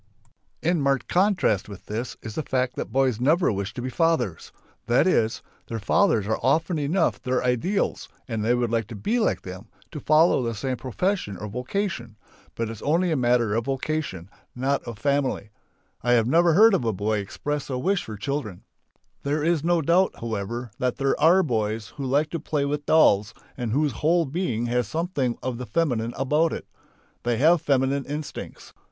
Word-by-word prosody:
In 170 -1 +2
marked 135 -3 +1
contrast 180 - +2
with 100 -2 -10
this 115 +4 -4
is 110 - -6
the 155 - -2
fact 130 -3 -1
that - - -5
boys 130 -4 +1
never 155 +6 +3
wish 100 -1 -3
to 125 - -5
be 130 - -2
fathers. 145 - 0 0.4
That 120 +6 +4
is: 115 -12 +1 0.2
their 115 - -4
fathers 110 - +2
are 110 +1 -1
often 160 +4 +1
enough 160 +1 0
their 125 0 0
ideals 125 - 0 0.2
and 115 -4 -2
they 120 +3 +3
would 120 -2 0
like 115 -3 0
to 115 - -8
be 215 - 0
like 220 - 0
them, 95 +4 -9 0.2
to 150 - -6
follow 155 +1 +4
the 115 -2 -2
same 130 +4 -3
profession 130 - -2
or 105 - -6
vocation. 125 - -3 0.4
But 115 - -2
it's 115 - -9
only 170 +4 +1
a - - +2
matter 120 -4 +2
of 115 +1 0
vocation, 135 - -3 0.3
not 135 +3 0
of 115 -3 -7
family. 135 -5 -1 0.5
I 120 +1 +2
have 115 -2 +4
never 170 +7 +4
yet - - +2
heard 220 +1 +7
a 190 - +3
boy 110 -2 -1
express 145 +9 -4
a 130 - -2
wish 190 +8 0
for 110 -1 -7
children. 110 -5 -4 0.6
There 145 +2 -1
is 165 -2 +1
no 170 -1 +2
doubt 180 +5 +3
however, 115 +1 -4
that 125 -1 0
there 135 -1 +1
are 180 +4 +6
boys 110 - -2
who 140 -2 -6
like 145 +4 +1
to 170 - -2
play 150 -2 -1
with 145 +1 -3
dolls 105 -8 +4 0.2
and 120 -4 -3
whose 145 +4 +1
whole 165 +8 +2
being 135 -6 -2
has 120 0 0
something 155 -7 -1
of 125 -1 -3
the 125 - -6
feminine 120 -8 0
about 150 +5 +2
it. - - -6 0.6
They 120 -1 0
have 160 +5 +4
feminine 135 0 +1
instincts. 145 +1 -7
130 Hz, 190 wpm, -25 LUFS, 115-155 Hz, 0.6 s, heard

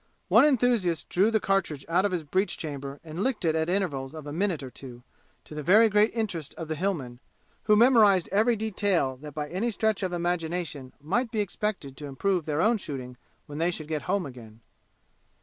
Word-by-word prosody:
One - - +7
enthusiast 240 - +1
drew 195 +5 +3
the 220 -1 +2
cartridge 190 -8 -1
out 175 +4 +2
of 205 - +1
his 175 -3 -2
breech 185 +7 -1
chamber 140 -2 -6
and 165 +2 -6
licked 250 -7 -1
it 160 - +3
at 160 +1 0
intervals 160 -8 -1
of 155 -2 -8
a 145 - -6
minute 175 -3 -1
or 130 - -8
two, 125 -2 -11 0.4
to - - -12
the 150 - -4
very 210 +9 +6
great 210 +1 +4
interest 195 -10 -3
of 165 - -6
the - - 0
Hillmen, 150 -9 -3 0.5
who 210 - +5
memorized 215 -6 +5
every 220 +4 +3
detail 200 -10 0
that 150 +1 -10
by 150 -1 -3
any 200 +7 -1
stretch 220 -2 0
of 185 -2 -1
imagination 170 -5 -3
might 210 - -1
be 220 -2 -3
expected 200 -8 -3
to 150 - -7
improve 175 +5 -1
their 150 +1 0
own 225 +3 +3
shooting 130 -9 -7 0.3
when 145 0 -7
they 165 +2 +2
should 155 -4 -5
get 155 -2 -2
home 195 -2 +1
again. 115 -4 -11
175 Hz, 200 wpm, -27 LUFS, 145-205 Hz, 0.5 s, One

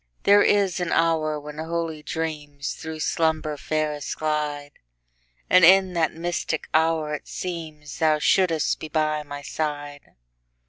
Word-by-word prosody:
There 205 +1 +6
is 195 -3 +2
an 175 -2 -2
hour 155 -2 +1
when 150 +1 -9
holy 165 -1 -3
dreamsThrough 155 0 -5
slumber 160 -2 0
fairest 150 0 -2
glide; 150 -2 -2 0.8
And 185 -1 +5
in 190 +1 +6
that 165 -2 +1
mystic 165 -1 -3
hour 160 -1 +2
it 150 - -5
seemsThou 155 -3 -2
shouldst 165 -1 +2
be 155 - -6
by 155 -1 0
my 145 -1 -8
side. 145 -2 -5
155 Hz, 125 wpm, -24 LUFS, 150-165 Hz, 0.8 s, There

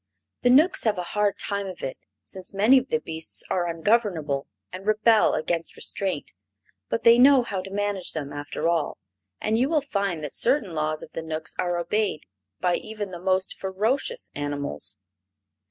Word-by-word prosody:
The 245 - +3
Knooks 300 +9 +5
have 215 -3 +2
a 180 - -2
hard 210 -1 +1
time 200 -1 -2
of 185 -2 -8
it, 130 - -3 0.3
since 190 +1 -7
many 225 +7 +6
of 255 - -9
the 235 - +2
beasts 160 -4 -4
are 175 -2 +1
ungovernable 165 -5 0 0.3
and 190 +2 -7
rebel 215 +1 +4
against 165 +1 -2
restraint. 190 -7 -3 0.6
But 115 - -1
they 235 +1 +7
know 265 0 +7
how 195 -5 -3
to 190 - -9
manage 200 -2 -2
them, 145 -3 -5
after 145 +3 -3
all, 165 -3 0 0.4
and 220 +1 +1
you 260 +3 +2
will 310 -2 +2
find 200 - -2
that 150 - -5
certain 240 - +3
laws 155 0 -1
of - - -11
the - - -4
Knooks 160 0 -4
are 175 -1 0
obeyed 175 -1 -1 0.4
by 180 -1 +2
even 215 -3 -6
the 175 -1 -7
most 185 0 +1
ferocious 225 - -1
animals. 145 -8 -3
190 Hz, 175 wpm, -25 LUFS, 160-220 Hz, 0.6 s, they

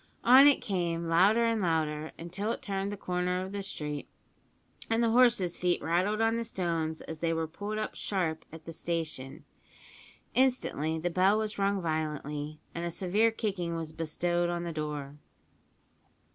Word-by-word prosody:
On 260 +4 +9
it 285 - +5
came, 170 -5 -1
louder 195 +8 +4
and 230 -2 +1
louder, 155 -3 0
until 180 +6 -3
it - - -5
turned 195 0 -2
the 205 - -5
corner 180 0 -1
of 190 +1 -5
the 200 0 -3
street, 150 -6 -5 0.8
and 225 +1 +2
the 230 - +3
horses' 235 -8 +4
feet 175 -1 +1
rattled 185 +6 +1
on 225 +1 +2
the 235 - -1
stones 165 -7 -2
as 160 -1 -7
they 165 0 0
were 165 0 0
pulled 205 +7 -5
up 215 - -2
sharp 175 -6 -2
at 160 0 -11
the 165 - -7
station. 160 -4 -4 0.9
Instantly 245 - +1
the 175 +2 -2
bell 190 +4 +4
was 215 -1 -2
rung 200 -1 +1
violently, 150 -1 -3
and 170 - -4
a 170 - -1
severe 195 +6 +2
kicking 190 -6 -2
was 165 -1 -4
bestowed 175 +2 -1
on 175 0 -2
the 170 -1 -4
door. 150 -2 -5
175 Hz, 170 wpm, -30 LUFS, 160-205 Hz, 0.9 s, On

